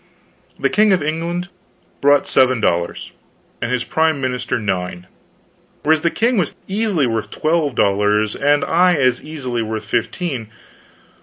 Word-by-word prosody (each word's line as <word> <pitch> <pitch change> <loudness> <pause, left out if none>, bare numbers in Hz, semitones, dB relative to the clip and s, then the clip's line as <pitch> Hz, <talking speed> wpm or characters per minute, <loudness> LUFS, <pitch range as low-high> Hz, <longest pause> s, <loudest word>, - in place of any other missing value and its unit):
The - - +1
King 210 0 +4
of 180 -5 +1
England 170 +3 -3 0.5
brought 145 0 +4
seven 130 -2 +3
dollars, 85 -5 -1 0.5
and 120 - -2
his 125 -1 0
prime 160 -2 +1
minister 125 -2 -2
nine; 90 -4 -3 0.8
whereas 155 0 +3
the 170 - +2
king 230 +4 +1
was 175 - -1
easily 195 -7 0
worth 110 -3 -2
twelve 155 -1 0
dollars 105 +1 +2
and 145 +1 +2
I 180 +1 +3
as 130 -4 +2
easily 130 -6 -4
worth 110 0 -4
fifteen. 125 - -2
140 Hz, 140 wpm, -19 LUFS, 115-165 Hz, 0.8 s, King